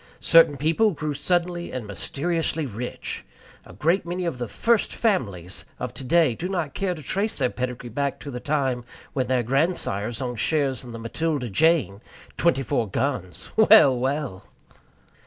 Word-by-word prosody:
Certain 165 -4 +6
people 165 +10 +3
grew 150 -1 -3
suddenly 175 +3 -1
and 125 -4 -4
mysteriously 150 - -1
rich. 120 0 -5 0.4
A - - -12
great 165 - +1
many 175 +1 -3
of 165 -7 -3
"the 120 - -2
first 230 - +1
families" 100 - -1 0.2
of - - -4
today 155 0 +2
do 175 +10 -4
not 170 -7 -2
care 190 -2 -1
to 155 - -10
trace 205 - -1
their 130 -3 0
pedigree 125 -1 -4
back 140 +3 -2
to 145 - -6
the 125 - -5
time 135 -4 -1 0.3
when 130 -2 0
their 125 -1 +1
grandsires 120 - 0
owned 125 -3 -4
shares 140 -4 0
in 125 - -10
the 115 - -7
Matilda 125 +2 -2
Jane, 115 - +2 0.3
twenty 165 -6 +2
four 120 -5 -1
guns. 95 - -3
Well, 215 -11 +7
well! 130 -6 -2
140 Hz, 160 wpm, -24 LUFS, 120-165 Hz, 0.4 s, Well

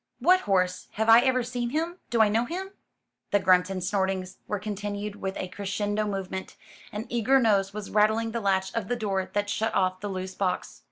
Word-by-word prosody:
"What 355 +9 +5
horse? 185 -1 +1
Have 220 +1 0
I 225 +1 +10
ever 255 0 +2
seen 240 0 -3
him? 330 +6 -2
Do 230 -2 +4
I - - +4
know 225 +3 +1
him?" 375 +7 -5 0.6
The 205 - +4
grunts 185 -1 +4
and 185 -2 -3
snortings 190 -1 -1
were 210 - -1
continued 205 0 -4
with 190 -1 -4
a - - -3
crescendo 205 +2 -2
movement; 190 -1 -4 0.4
an 210 +2 -5
eager 240 +3 +3
nose 200 -5 +2
was 210 0 -7
rattling 220 +2 +2
the 230 +1 -3
latch 190 -1 +1
of 230 -4 -2
the 245 - 0
door 195 -5 -2
that 205 0 0
shut 220 +2 -1
off 185 -1 +1
the 205 +1 -4
loose 190 -1 -4
box. 185 -2 -2
205 Hz, 205 wpm, -27 LUFS, 190-230 Hz, 0.6 s, I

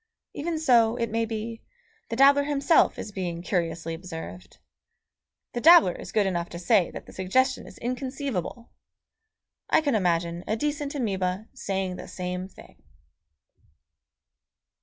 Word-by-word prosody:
Even 325 +2 -3
so, 240 -7 +4
it 230 -2 -2
may 230 +1 +1
be, 225 +1 -5 0.5
the 230 - -2
dabbler 280 +2 +6
himself 290 +3 +3
is 210 - -6
being 175 -3 -4
curiously 165 -3 -2
observed.... 160 - -8 1.0
The 240 - -3
dabbler 330 - +8
is - - -9
good 210 -2 +2
enough 175 -2 -1
to - - -7
say 180 +1 +3
that - - -9
the - - -14
suggestion 260 +8 +1
is - - -13
inconceivable. 250 - -4 1.0
I - - +5
can 290 -4 0
imagine 170 -3 0
a 215 - +1
decent 290 +2 -2
amoeba 195 -4 -2
saying 190 -2 -3
the - - -8
same 180 0 -4
thing. - - -17
215 Hz, 140 wpm, -26 LUFS, 180-260 Hz, 1.0 s, dabbler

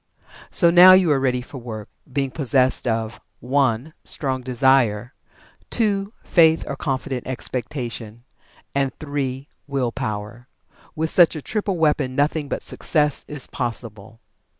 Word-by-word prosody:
So 170 -3 +4
now 180 +2 +9
you 185 -4 +5
are 140 - +3
ready 125 -2 0
for 130 +2 -10
work, 110 -3 -7 0.2
being 135 0 -1
possessed 130 -2 +1
of 115 0 -2 0.2
(1) 130 +2 0
Strong 130 -3 -2
Desire; 125 -2 +2 0.6
(2) 205 -3 +1
Faith 160 -2 +4
or 140 - -4
Confident 130 -2 -3
Expectation; 120 -3 -5 0.5
and 140 -1 0
(3) 140 -2 -4 0.2
Will 135 -4 -1
power. 110 +3 -5 0.5
With 160 0 -1
such 175 -2 +5
a 155 - -5
triple 205 -4 -2
weapon 150 -5 +1
nothing 145 +1 0
but - - -3
Success 150 -3 0
is 150 -3 -6
possible. 115 -3 -5
135 Hz, 130 wpm, -22 LUFS, 120-150 Hz, 0.6 s, now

